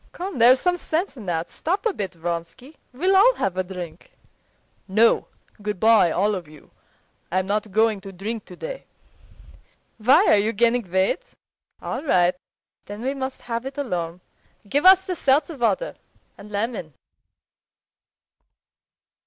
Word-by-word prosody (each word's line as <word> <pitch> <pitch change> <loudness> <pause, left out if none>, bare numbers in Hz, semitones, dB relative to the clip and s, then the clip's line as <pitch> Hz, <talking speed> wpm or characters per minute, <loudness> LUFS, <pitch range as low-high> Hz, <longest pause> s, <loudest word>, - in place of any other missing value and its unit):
"Come, 365 -5 -5
there's 250 +3 +7
some 355 +3 +1
sense 340 +2 -2
in 220 -7 -10
that. 165 -1 -2
Stop 380 +6 -2
a 450 - +2
bit, 195 - -4
Vronsky. 170 - -6
We'll 365 +10 +1
all 475 +6 +6
have 190 - -1
a 185 - 0
drink." 180 -3 -9 0.7
"No; 220 +4 +3 0.3
good 210 -2 -4
bye 220 -5 +5
all 200 +6 +1
of 180 -5 -5
you. 150 -1 -17 0.6
I'm 185 0 +1
not 210 +2 -1
going 220 0 +2
to 195 - -9
drink 210 +4 -5
today." - - -8 1.1
"Why, 240 +5 +5
are - - +5
you 215 +3 +1
gaining 235 -1 +1
weight? 190 - +1 0.6
All - - -3
right, 180 - +3 0.5
then 205 +3 -7
we 265 +2 -1
must 265 -1 -5
have 230 -1 -3
it 270 - -8
alone. 180 -10 -3 0.5
Give 285 - +3
us 380 0 +7
the 365 - -3
seltzer 290 +2 +1
water 270 - 0 0.4
and 205 - -13
lemon." 205 - -3
220 Hz, 145 wpm, -23 LUFS, 185-280 Hz, 1.1 s, there's